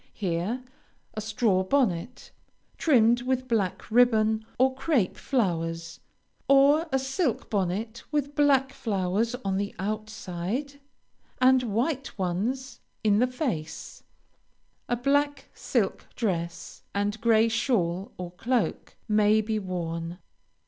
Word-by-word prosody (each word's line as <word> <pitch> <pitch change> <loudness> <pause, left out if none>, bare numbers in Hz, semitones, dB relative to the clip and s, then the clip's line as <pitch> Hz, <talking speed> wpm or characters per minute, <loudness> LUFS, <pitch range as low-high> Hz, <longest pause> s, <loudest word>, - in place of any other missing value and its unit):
Here 195 +6 -2 0.5
a 215 - -4
straw 215 -3 +1
bonnet, 235 -1 0 0.5
trimmed 240 -5 +4
with 255 0 -1
black 220 -4 -1
ribbon 220 -2 +4
or 260 +1 +3
crape 265 - +1
flowers, 165 -8 -2 0.5
or 285 +4 +5
a 265 - +3
silk 270 - -1
bonnet 210 +4 -2
with 290 -1 -1
black 275 -2 +3
flowers 210 +2 -1
on 190 -1 0
the 200 +1 -3
outside, 215 +5 -4 0.6
and 255 0 +5
white 250 +5 -2
ones 220 +9 -2 0.2
in 210 -1 +4
the 250 - +4
face, 245 - -4 0.9
a 245 - +2
black 285 +3 0
silk - - -1
dress, 170 -6 -3
and 205 +2 -1
gray 225 -1 +4
shawl 200 -6 0
or 180 -1 -6
cloak, 230 +6 -1
may 210 0 +4
be 215 0 -1
worn. 170 -3 -4
220 Hz, 115 wpm, -27 LUFS, 190-260 Hz, 0.9 s, or